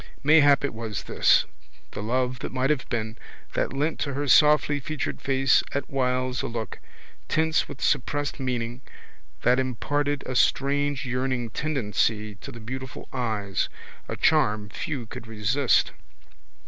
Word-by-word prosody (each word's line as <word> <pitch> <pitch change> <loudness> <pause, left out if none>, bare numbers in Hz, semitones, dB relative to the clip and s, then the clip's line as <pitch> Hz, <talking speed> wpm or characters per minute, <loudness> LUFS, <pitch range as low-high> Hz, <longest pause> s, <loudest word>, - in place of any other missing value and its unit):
Mayhap 145 -1 +6
it 140 - -3
was 110 -3 -5
this, - - +4 0.5
the - - -6
love 125 +3 -1
that - - -5
might 130 +2 +1
have 145 -4 -2
been, 115 -1 -3 0.4
that - - 0
lent 145 +4 -1
to 140 -2 -2
her 145 - -1
softlyfeatured 150 0 +3
face 135 -1 +3
at 140 -1 -3
whiles 130 -2 0
a - - -3
look, 115 -1 -5 0.5
tense 160 0 +2
with 135 - -9
suppressed 145 +1 0
meaning, 125 -1 -3 0.6
that 125 +2 +4
imparted 145 +3 -1
a 130 - -4
strange 140 +1 +2
yearning 125 -2 -1
tendency 110 -7 0
to 100 - -10
the 115 - -10
beautiful 130 +3 -7
eyes, 110 -6 -1 0.4
a - - -4
charm 105 0 +2
few 130 +3 -4
could 115 +1 -9
resist. 115 +5 +2
130 Hz, 140 wpm, -26 LUFS, 115-145 Hz, 0.6 s, Mayhap